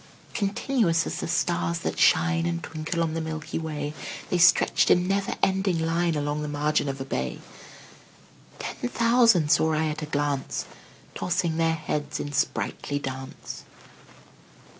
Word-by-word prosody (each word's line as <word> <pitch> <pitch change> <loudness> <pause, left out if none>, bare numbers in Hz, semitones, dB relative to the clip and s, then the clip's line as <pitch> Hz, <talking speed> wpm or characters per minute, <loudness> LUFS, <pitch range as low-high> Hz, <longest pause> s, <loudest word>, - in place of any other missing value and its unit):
Continuous 205 -4 +1
as - - -4
the - - -3
stars 85 0 0
that - - -3
shine 80 0 +4
And 85 -1 -2
twinkle 160 +2 -2
on 160 -1 -1
the 165 - -2
milky 160 0 -4
way, 150 -2 -4 0.4
The 180 - +2
stretched 175 +1 +5
in 180 0 +4
never 195 0 0
ending 190 -2 +2
line 165 +1 +1
Along 145 0 -1
the 150 - -3
margin 145 0 0
of 135 0 -4
a 135 - -4
bay: 65 - -3 1.2
Ten 120 - -4
thousand 230 - +4
saw 160 0 +4
I 155 +1 +1
at 150 +1 -4
a 155 - -4
glance, 145 -2 -1 0.5
Tossing 170 -2 -1
their 165 0 +2
heads 150 -1 -3
in 145 - -4
sprightly 145 0 -1
dance. 130 -1 -6
155 Hz, 150 wpm, -26 LUFS, 145-170 Hz, 1.2 s, stretched